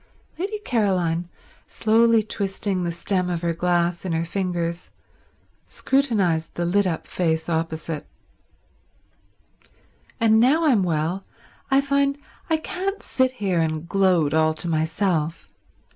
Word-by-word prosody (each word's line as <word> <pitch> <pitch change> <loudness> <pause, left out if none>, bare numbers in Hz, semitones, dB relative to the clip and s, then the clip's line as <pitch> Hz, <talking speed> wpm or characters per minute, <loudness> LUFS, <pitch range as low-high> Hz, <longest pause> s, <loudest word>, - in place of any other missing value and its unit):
Lady 405 +4 -2
Caroline, 185 - 0 0.4
slowly 225 0 +3
twisting 195 -2 -2
the 170 - -1
stem 180 +2 -1
of 175 -1 -3
her 170 -1 +1
glass 175 0 0
in 185 -3 -2
her 165 +1 0
fingers, 175 -2 -3 0.8
scrutinized 205 -12 0
the 175 - -1
lit 195 +3 +2
up 165 -3 -3
face 160 -2 -1
opposite. 160 -2 -3 2.1
"And 220 -1 +4
now 290 +8 +4
I'm 250 -9 +4
well 170 +1 -1 0.5
I 270 0 +4
find 280 0 +1 0.3
I 320 - +3
can't 385 +5 -4
sit 260 -1 +1
here 195 -7 -1
and 160 0 -1
gloat 180 -6 +2
all 160 0 +3
to 170 - -4
myself. 160 0 -1
180 Hz, 125 wpm, -23 LUFS, 165-225 Hz, 2.1 s, And